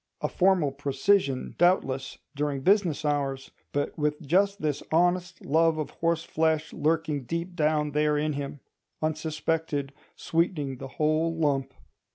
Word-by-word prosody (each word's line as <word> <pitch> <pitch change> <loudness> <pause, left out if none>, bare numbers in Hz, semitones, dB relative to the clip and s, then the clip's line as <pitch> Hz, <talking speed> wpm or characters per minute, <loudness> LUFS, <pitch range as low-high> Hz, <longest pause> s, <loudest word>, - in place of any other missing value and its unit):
A - - 0
formal 180 -6 +2
precisian, 140 +1 +1
doubtless, 135 -7 +2 0.2
during 145 -1 -1
business 180 -4 +2
hours; 140 -2 -1 0.2
but 145 0 -2
with 150 0 0
just 195 +6 +2
this 150 -2 -1
honest 175 +2 +1
love 160 +2 +3
of 155 - -3
horseflesh 160 -1 0
lurking 155 -3 0
deep 170 +6 -4
down 150 -2 +1
there 150 0 +2
in 150 +1 0
him—unsuspected, 155 +1 -3 0.2
sweetening 160 -5 -1
the 135 - -6
whole 155 +2 +1
lump. 140 -4 0
155 Hz, 125 wpm, -27 LUFS, 145-165 Hz, 0.2 s, love